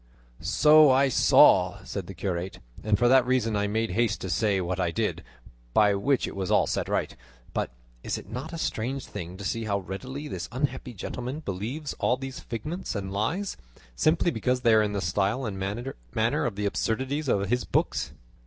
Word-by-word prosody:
"So 155 Hz, -1 st, +6 dB
I 135 Hz, +1 st, +4 dB
saw," -, -, +5 dB
said 95 Hz, -3 st, -5 dB
the 95 Hz, -, -8 dB
curate, 90 Hz, 0 st, -3 dB, 0.3 s
"and 105 Hz, -1 st, +2 dB
for 120 Hz, -, +3 dB
that 130 Hz, +1 st, +6 dB
reason 125 Hz, -3 st, +1 dB
I 105 Hz, 0 st, +1 dB
made 110 Hz, +2 st, -1 dB
haste 115 Hz, -3 st, +1 dB
to 95 Hz, -, -3 dB
say 105 Hz, -1 st, +2 dB
what 90 Hz, 0 st, -2 dB
I 90 Hz, -2 st, +1 dB
did, 85 Hz, -, -2 dB, 0.5 s
by 105 Hz, -1 st, +5 dB
which 130 Hz, +7 st, +1 dB
it -, -, -7 dB
was 95 Hz, -2 st, -3 dB
all -, -, +4 dB
set -, -, -2 dB
right. -, -, -1 dB, 0.4 s
But -, -, -1 dB, 0.3 s
is -, -, -2 dB
it -, -, -10 dB
not 130 Hz, +8 st, -6 dB
a 165 Hz, -, -5 dB
strange 130 Hz, -1 st, -2 dB
thing 90 Hz, -2 st, -7 dB
to 100 Hz, -, -8 dB
see 115 Hz, +4 st, -2 dB
how 100 Hz, -2 st, 0 dB
readily 130 Hz, -, -6 dB
this -, -, -5 dB
unhappy 130 Hz, -1 st, -3 dB
gentleman 125 Hz, -, -5 dB
believes 120 Hz, -, -4 dB
all 125 Hz, -, +2 dB
these 135 Hz, 0 st, -6 dB
figments 150 Hz, -, -5 dB
and 95 Hz, -1 st, -4 dB
lies, 145 Hz, -, -1 dB, 0.4 s
simply 165 Hz, -, +2 dB
because 125 Hz, +1 st, 0 dB
they 115 Hz, -2 st, +4 dB
are 110 Hz, -, +6 dB
in 105 Hz, -1 st, 0 dB
the 100 Hz, -, -1 dB
style 100 Hz, +9 st, 0 dB
and 100 Hz, -3 st, -4 dB
manner 95 Hz, -, -2 dB
of -, -, -4 dB
the 105 Hz, +1 st, -2 dB
absurdities 130 Hz, +8 st, -1 dB
of 100 Hz, -5 st, +1 dB
his 125 Hz, +2 st, +1 dB
books?" -, -, 0 dB
115 Hz, 195 wpm, -27 LUFS, 100-130 Hz, 0.5 s, So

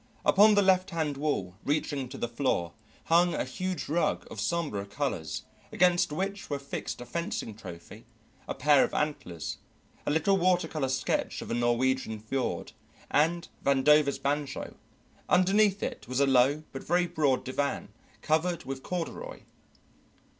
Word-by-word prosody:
Upon 210 Hz, +2 st, +6 dB
the 205 Hz, -, +5 dB
left 185 Hz, -1 st, +3 dB
hand 160 Hz, -4 st, -1 dB
wall, 120 Hz, -11 st, -2 dB
reaching 145 Hz, -3 st, -1 dB
to 135 Hz, -, -8 dB
the -, -, -2 dB
floor, 115 Hz, -8 st, -1 dB, 0.3 s
hung 170 Hz, +1 st, +3 dB
a -, -, 0 dB
huge 185 Hz, -4 st, -4 dB
rug 165 Hz, +4 st, 0 dB
of -, -, -7 dB
sombre 155 Hz, -13 st, -1 dB
colours 100 Hz, -, -3 dB, 0.3 s
against 175 Hz, -3 st, +3 dB
which 195 Hz, +6 st, -3 dB
were 145 Hz, -, -1 dB
fixed 140 Hz, -2 st, -5 dB
a -, -, -7 dB
fencing 170 Hz, -7 st, -3 dB
trophy, 85 Hz, -6 st, -11 dB, 0.4 s
a -, -, -3 dB
pair 145 Hz, -2 st, +5 dB
of -, -, -2 dB
antlers, 115 Hz, -, -3 dB, 0.5 s
a -, -, +3 dB
little 175 Hz, +6 st, +3 dB
water 180 Hz, 0 st, +2 dB
colour 145 Hz, -4 st, -2 dB
sketch 130 Hz, 0 st, -1 dB
of -, -, -7 dB
a -, -, +1 dB
Norwegian 120 Hz, -1 st, +1 dB
fjord, 125 Hz, +5 st, -3 dB, 0.4 s
and 165 Hz, +3 st, +2 dB, 0.2 s
Vandover's 140 Hz, +1 st, +4 dB
banjo; 145 Hz, 0 st, -2 dB, 0.5 s
underneath 195 Hz, +2 st, +4 dB
it -, -, -4 dB
was 130 Hz, +2 st, -1 dB
a 140 Hz, -, +5 dB
low 135 Hz, +3 st, +3 dB
but 135 Hz, -, -7 dB
very 175 Hz, +2 st, +2 dB
broad 145 Hz, -6 st, +1 dB
divan 140 Hz, +2 st, -2 dB, 0.3 s
covered 165 Hz, +3 st, +1 dB
with 135 Hz, 0 st, -5 dB
corduroy. 180 Hz, -, -5 dB
145 Hz, 150 wpm, -29 LUFS, 130-175 Hz, 0.5 s, Upon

